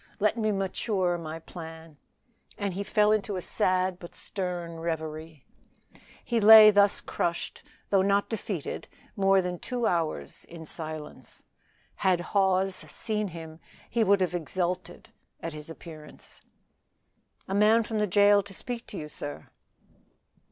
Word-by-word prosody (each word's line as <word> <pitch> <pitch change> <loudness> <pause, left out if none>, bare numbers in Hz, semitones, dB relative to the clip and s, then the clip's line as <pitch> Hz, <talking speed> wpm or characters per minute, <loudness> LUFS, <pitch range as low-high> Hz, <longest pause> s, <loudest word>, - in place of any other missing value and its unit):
Let 210 +1 +2
me 215 -2 0
mature 195 -1 -1
my 160 -1 -6
plan;" 160 -2 -10 0.6
and 200 -2 -2
he 200 +3 -3
fell 210 +1 +3
into 210 -1 0
a 185 - -3
sad 185 0 0
but 170 - -11
stern 175 -3 -5
reverie. 160 -2 -5 0.8
He 235 -2 0
lay 215 0 +10
thus 200 -1 +4
crushed, 170 0 -3 0.3
though 195 -2 +5
not 200 +1 +2
defeated, 200 -7 -4 0.3
more 195 -1 +3
than 180 -1 -4
two 245 -2 -3
hours 160 - -2
in 165 -1 -10
silence. 155 -1 -8 0.5
Had 185 -3 +2
Hawes 190 -1 +3
seen 210 +6 -3
him 160 -2 -9 0.3
he 230 -1 +2
would 200 -2 +3
have 180 -1 0
exulted 175 +1 -3 0.3
at 165 -1 -5
his 150 +1 -8
appearance. 160 -2 -12 1.1
"A 190 - -3
man 215 +3 +5
from 220 0 -3
the 210 - +1
jail 205 +1 +5
to 195 -1 -10
speak 240 +2 -5
to 200 - -7
you, 150 - -5
sir." 145 -1 -7
185 Hz, 140 wpm, -28 LUFS, 165-205 Hz, 1.1 s, lay